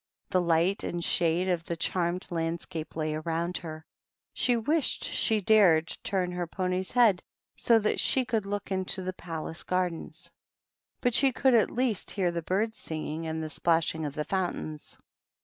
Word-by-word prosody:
The 185 - +3
light 170 +3 +2
and 175 0 -3
shade 170 +2 +2
of 175 -3 0
the 170 - -3
charmed 175 +1 -1
landscape 165 -1 -3
lay 155 -1 -1
around 165 +3 -2
her; 155 -2 -8 0.5
she 245 -1 +2
wished 295 +6 0
she 220 -2 +1
dared 180 -6 +4
turn 185 -3 -1
her 180 -1 -3
pony's 185 +1 -2
head 230 -7 +4 0.3
so 230 - +4
that 215 -1 0
she 260 -1 +3
could 220 -4 -1
look 205 0 -4
into 190 0 -1
the 185 0 -3
palace 165 -2 -4
gardens; 180 -2 -3 0.7
but 245 -2 +2
she 270 +2 +4
could 260 +1 +3
at 225 -3 +4
least 240 -4 -1
j - - -3
hear 185 -4 +1
the 170 0 -3
birds 210 +7 -1
singing 160 0 -4
and 160 0 -3
the 155 - -4
splashing 165 -1 +1
of 145 -2 -4
the 150 - -1
J - - -22
fountains. 175 -5 -3
180 Hz, 175 wpm, -28 LUFS, 165-205 Hz, 0.7 s, dared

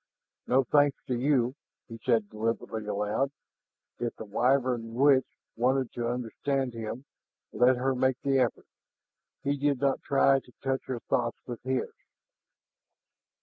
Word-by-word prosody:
"No 130 +2 +4
thanks 145 +2 +3
to - - +1
you," 125 -1 +2 0.3
he 115 0 -9
said 115 -4 +2
deliberately 110 0 -3
aloud. 105 +6 0 0.7
If 120 -1 -2
the 110 - -8
Wyvern 120 +1 +1
witch 135 0 +5 0.3
wanted 130 +2 +1
to 120 -1 -2
understand 125 +2 -2
him, 115 +3 -6 0.5
let 125 +1 +4
her 130 +2 +1
make 130 0 +1
the 135 -1 +3
effort; 125 -3 0 0.8
he 140 +1 +1
did 140 -1 +1
not 140 -1 +1
try 135 0 +4
to 125 - -20
touch 135 0 -1
her 125 -3 -3
thoughts 120 -1 -1
with 120 -2 -6
his. 130 0 -2
125 Hz, 140 wpm, -29 LUFS, 115-135 Hz, 0.8 s, witch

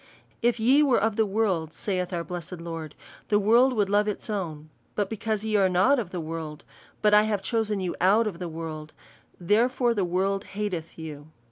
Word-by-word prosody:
" - - -36
If 240 - -3
ye 260 +6 +5
were 275 -5 +4
of 220 +1 0
the 220 -1 +2
world/' 190 -6 0
saith 185 -3 -2
our 170 -2 -2
blessed 175 0 -6
Lord, 165 -2 -6 0.2
'' - - -22
the 205 - +4
world 235 +6 +4
would 210 -4 +1
love 205 +1 +2
its 210 +1 -3
own; 155 -6 -4 0.2
but 205 -1 -1
because 220 -1 -2
ye 220 -1 -1
are 190 -2 +4
not 190 +10 +4
of 210 -7 -4
the 180 - -5
world, 160 -2 -6 0.4
but 210 0 +4
I 210 - +8
have 205 -3 -1
chosen 215 -1 0
you 185 -2 -3
out 205 +5 +4
of 190 -6 -4
the 175 -2 -4
world, 155 -1 -7 0.5
therefore 235 +6 +2
the 205 -4 0
world 190 +3 0
hateth 185 -6 -4
you." 150 -2 -8
195 Hz, 210 wpm, -26 LUFS, 170-215 Hz, 0.5 s, I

